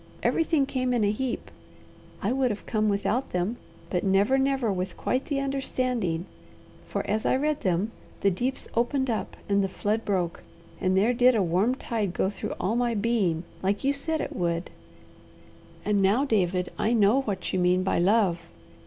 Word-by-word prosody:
Everything 320 Hz, -4 st, +2 dB
came 255 Hz, -2 st, -1 dB
in 230 Hz, -, +2 dB
a 205 Hz, -, +3 dB
heap. 250 Hz, +3 st, -3 dB, 0.7 s
I -, -, +1 dB
would 260 Hz, -1 st, +2 dB
have 210 Hz, -2 st, -5 dB
come 215 Hz, -1 st, +1 dB
without 205 Hz, +5 st, 0 dB
them, 180 Hz, +7 st, -1 dB, 0.3 s
but 180 Hz, -, 0 dB
never, 200 Hz, +7 st, +3 dB
never 265 Hz, -5 st, +1 dB
with 185 Hz, -1 st, -4 dB
quite 255 Hz, +1 st, -1 dB
the 285 Hz, -3 st, -1 dB
understanding, 255 Hz, -10 st, -1 dB, 0.6 s
for -, -, -3 dB
as 215 Hz, +1 st, 0 dB
I -, -, +2 dB
read 300 Hz, +2 st, 0 dB
them 185 Hz, +4 st, 0 dB, 0.3 s
the 200 Hz, -, +4 dB
deeps 250 Hz, +9 st, -2 dB
opened 255 Hz, +2 st, +1 dB
up, 220 Hz, -, -3 dB
and 200 Hz, 0 st, +2 dB
the 195 Hz, -, -1 dB
flood 215 Hz, +4 st, -1 dB
broke, 180 Hz, -4 st, -1 dB, 0.4 s
and 185 Hz, 0 st, +1 dB
there 220 Hz, +6 st, +3 dB
did 250 Hz, 0 st, +5 dB
a 210 Hz, -, +3 dB
warm 185 Hz, +9 st, +2 dB
tide 215 Hz, -8 st, -2 dB
go 190 Hz, -, +1 dB
through -, -, -5 dB
all 210 Hz, +5 st, 0 dB
my 240 Hz, -1 st, +1 dB
being, 200 Hz, -7 st, +1 dB, 0.2 s
like 200 Hz, +5 st, 0 dB
you 275 Hz, +1 st, +3 dB
said 315 Hz, +2 st, -2 dB
it -, -, -5 dB
would; 170 Hz, 0 st, -1 dB, 1.1 s
and 205 Hz, -1 st, +2 dB
now, 210 Hz, +9 st, +3 dB
David, 185 Hz, -7 st, +1 dB
I 225 Hz, -, +2 dB
know 225 Hz, +4 st, +4 dB
what 205 Hz, -7 st, -3 dB
you 185 Hz, -, +1 dB
mean 180 Hz, +1 st, +3 dB
by 190 Hz, -, +1 dB
love. 190 Hz, -1 st, +3 dB
215 Hz, 180 wpm, -27 LUFS, 190-255 Hz, 1.1 s, did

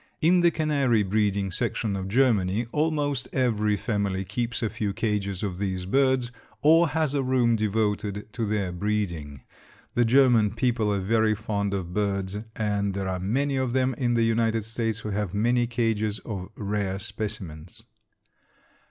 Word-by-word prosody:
In 175 Hz, +3 st, +4 dB
the 170 Hz, -, +5 dB
canary 140 Hz, -9 st, +1 dB
breeding 100 Hz, -1 st, 0 dB
section 100 Hz, +3 st, -1 dB
of 95 Hz, -1 st, -4 dB
Germany, 110 Hz, -2 st, +2 dB
almost 150 Hz, -3 st, 0 dB
every 105 Hz, -5 st, +1 dB
family 100 Hz, -3 st, -1 dB
keeps 115 Hz, +4 st, -2 dB
a 110 Hz, -, +1 dB
few 105 Hz, -2 st, -2 dB
cages 100 Hz, -3 st, -2 dB
of 95 Hz, -3 st, -3 dB
these 95 Hz, -2 st, -2 dB
birds, 130 Hz, +2 st, +2 dB, 0.3 s
or 165 Hz, +3 st, +6 dB
has 155 Hz, -1 st, 0 dB
a 140 Hz, -, +1 dB
room 125 Hz, -3 st, +2 dB
devoted 105 Hz, -1 st, -1 dB
to 115 Hz, -3 st, -2 dB
their 100 Hz, -3 st, -1 dB
breeding. 85 Hz, -8 st, -3 dB, 0.5 s
The 120 Hz, -, +3 dB
German 120 Hz, -3 st, +4 dB
people 115 Hz, -3 st, +1 dB
are 100 Hz, -, 0 dB
very 110 Hz, +2 st, +2 dB
fond 100 Hz, -2 st, -2 dB
of 90 Hz, -2 st, -4 dB
birds 100 Hz, -1 st, -1 dB, 0.2 s
and 100 Hz, -2 st, -1 dB
there 95 Hz, -1 st, -2 dB
are 95 Hz, 0 st, -2 dB
many 135 Hz, +9 st, 0 dB
of 130 Hz, -2 st, -1 dB
them 130 Hz, 0 st, +2 dB
in 120 Hz, -3 st, 0 dB
the 115 Hz, -, +3 dB
United 115 Hz, -1 st, +1 dB
States 115 Hz, -1 st, -2 dB
who 110 Hz, 0 st, -5 dB
have 100 Hz, -2 st, -2 dB
many 120 Hz, +3 st, +2 dB
cages 110 Hz, -3 st, 0 dB
of 95 Hz, -4 st, -5 dB
rare 100 Hz, -2 st, -2 dB
specimens. 95 Hz, -6 st, -6 dB
110 Hz, 160 wpm, -26 LUFS, 100-120 Hz, 0.5 s, or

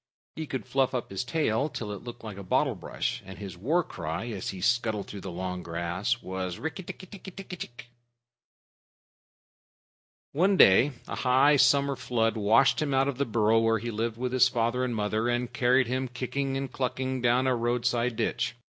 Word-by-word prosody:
He 160 Hz, -1 st, -5 dB
could 130 Hz, -, -4 dB
fluff 135 Hz, -1 st, +1 dB
up 120 Hz, -, -3 dB
his 95 Hz, -, -2 dB
tail 140 Hz, -1 st, 0 dB
till 110 Hz, -7 st, -5 dB
it 100 Hz, -, -7 dB
looked 120 Hz, -1 st, -9 dB
like 105 Hz, -3 st, -7 dB
a -, -, -6 dB
bottle 90 Hz, -, +1 dB
brush, -, -, -3 dB
and 95 Hz, 0 st, -10 dB
his 100 Hz, -3 st, -7 dB
war 150 Hz, -, +1 dB
cry 90 Hz, -, -5 dB
as 100 Hz, -4 st, -4 dB
he 95 Hz, -, -6 dB
scuttled 110 Hz, 0 st, +1 dB
through 100 Hz, -, -8 dB
the 95 Hz, -, -6 dB
long 90 Hz, +1 st, -4 dB
grass 85 Hz, +8 st, -2 dB
was: 95 Hz, -1 st, -4 dB
"Rikk 160 Hz, +3 st, -4 dB
tikk -, -, -8 dB
tikki 200 Hz, -, -11 dB
tikki 195 Hz, +1 st, -9 dB
tchk!" 175 Hz, -10 st, -8 dB, 2.5 s
One 190 Hz, +6 st, +3 dB
day, 125 Hz, -, +6 dB
a -, -, -5 dB
high 130 Hz, +3 st, +4 dB
summer 140 Hz, +2 st, +4 dB
flood 115 Hz, -3 st, 0 dB
washed 115 Hz, +8 st, +4 dB
him 140 Hz, -3 st, 0 dB
out 135 Hz, +1 st, +3 dB
of 140 Hz, -2 st, -3 dB
the 140 Hz, -, +2 dB
burrow 110 Hz, -1 st, +3 dB
where 115 Hz, 0 st, +3 dB
he 115 Hz, +2 st, -4 dB
lived 115 Hz, +1 st, -2 dB
with 125 Hz, +1 st, -2 dB
his 130 Hz, 0 st, +5 dB
father 120 Hz, +1 st, 0 dB
and 125 Hz, -2 st, -1 dB
mother, 110 Hz, +2 st, 0 dB
and 120 Hz, 0 st, -1 dB
carried 125 Hz, +1 st, +3 dB
him, 130 Hz, +2 st, -1 dB
kicking 135 Hz, +2 st, -2 dB
and 135 Hz, -1 st, -4 dB
clucking, 130 Hz, 0 st, -2 dB
down 120 Hz, +2 st, +3 dB
a 130 Hz, -1 st, +2 dB
roadside 120 Hz, 0 st, 0 dB
ditch. 120 Hz, +2 st, -1 dB
120 Hz, 190 wpm, -28 LUFS, 110-130 Hz, 2.5 s, day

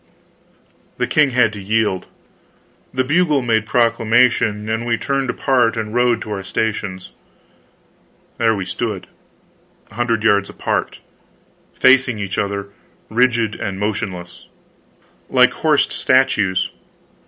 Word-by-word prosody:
The -, -, 0 dB
king 150 Hz, -2 st, +3 dB
had 125 Hz, -3 st, +2 dB
to 105 Hz, -, -7 dB
yield. 105 Hz, -2 st, 0 dB, 0.8 s
The 130 Hz, -, 0 dB
bugle 150 Hz, -1 st, +2 dB
made 110 Hz, -2 st, 0 dB
proclamation, 115 Hz, -2 st, +2 dB
and 110 Hz, +1 st, -1 dB
we 120 Hz, -1 st, 0 dB
turned 135 Hz, 0 st, -2 dB
apart 125 Hz, -3 st, +1 dB
and 110 Hz, -1 st, -4 dB
rode 120 Hz, -1 st, +2 dB
to 110 Hz, -, -8 dB
our 100 Hz, -2 st, -3 dB
stations. 100 Hz, -1 st, -3 dB, 1.3 s
There 115 Hz, -1 st, +3 dB
we 95 Hz, -2 st, -4 dB
stood, 105 Hz, -2 st, -4 dB, 0.9 s
a -, -, -16 dB
hundred 115 Hz, -1 st, -1 dB
yards 100 Hz, -3 st, +2 dB
apart, -, -, -3 dB, 0.8 s
facing 130 Hz, -3 st, +4 dB
each 100 Hz, -2 st, -3 dB
other, 100 Hz, 0 st, -3 dB, 0.4 s
rigid 115 Hz, -2 st, +2 dB
and 95 Hz, -3 st, -5 dB
motionless, 100 Hz, -4 st, -4 dB, 0.8 s
like -, -, +4 dB
horsed -, -, +1 dB
statues. 105 Hz, -8 st, +1 dB
110 Hz, 120 wpm, -19 LUFS, 100-125 Hz, 1.3 s, facing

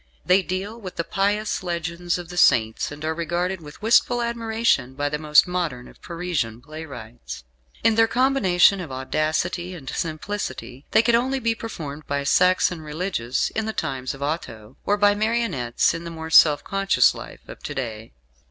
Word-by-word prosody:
They 185 Hz, +2 st, +5 dB
deal 195 Hz, +5 st, -5 dB
with 185 Hz, -3 st, -8 dB
the 170 Hz, -, -1 dB
pious 200 Hz, +6 st, -1 dB
legends 175 Hz, 0 st, -2 dB
of 175 Hz, -2 st, -8 dB
the 180 Hz, -, -8 dB
Saints, 110 Hz, -9 st, +3 dB
and 150 Hz, +1 st, -7 dB
are 160 Hz, -, 0 dB
regarded 175 Hz, +3 st, -2 dB
with 150 Hz, +6 st, -13 dB
wistful 240 Hz, +1 st, +3 dB
admiration 225 Hz, -, 0 dB
by 145 Hz, +1 st, -1 dB
the 150 Hz, 0 st, -3 dB
most 150 Hz, +1 st, +5 dB
modern 170 Hz, -9 st, -3 dB
of -, -, -18 dB
Parisian 165 Hz, -10 st, -3 dB
playwrights. 120 Hz, -, -9 dB, 0.4 s
In 225 Hz, 0 st, +5 dB
their 225 Hz, +1 st, +4 dB
combination 225 Hz, -7 st, +3 dB
of 160 Hz, -6 st, -7 dB
audacity 155 Hz, +7 st, -2 dB
and 145 Hz, -6 st, -11 dB
simplicity 155 Hz, -6 st, -5 dB
they -, -, +4 dB
could 235 Hz, -, +2 dB
only 255 Hz, +3 st, +2 dB
be 230 Hz, -2 st, +1 dB
performed 155 Hz, -10 st, -7 dB
by 140 Hz, 0 st, -1 dB
Saxon 180 Hz, +2 st, +3 dB
religious 150 Hz, -6 st, -2 dB
in 220 Hz, 0 st, -2 dB
the 220 Hz, -, -2 dB
times 130 Hz, -6 st, -3 dB
of 140 Hz, -, -7 dB
Otho, 115 Hz, -8 st, -5 dB
or 205 Hz, -, +3 dB
by 205 Hz, 0 st, +4 dB
marionettes 205 Hz, -, 0 dB
in 165 Hz, 0 st, -5 dB
the 170 Hz, -, -6 dB
more 160 Hz, -1 st, -7 dB
self 150 Hz, -2 st, +6 dB
conscious 195 Hz, 0 st, +3 dB
life -, -, -10 dB
of -, -, -11 dB
to -, -, -6 dB
day. 115 Hz, -4 st, -5 dB
170 Hz, 175 wpm, -23 LUFS, 145-205 Hz, 0.4 s, self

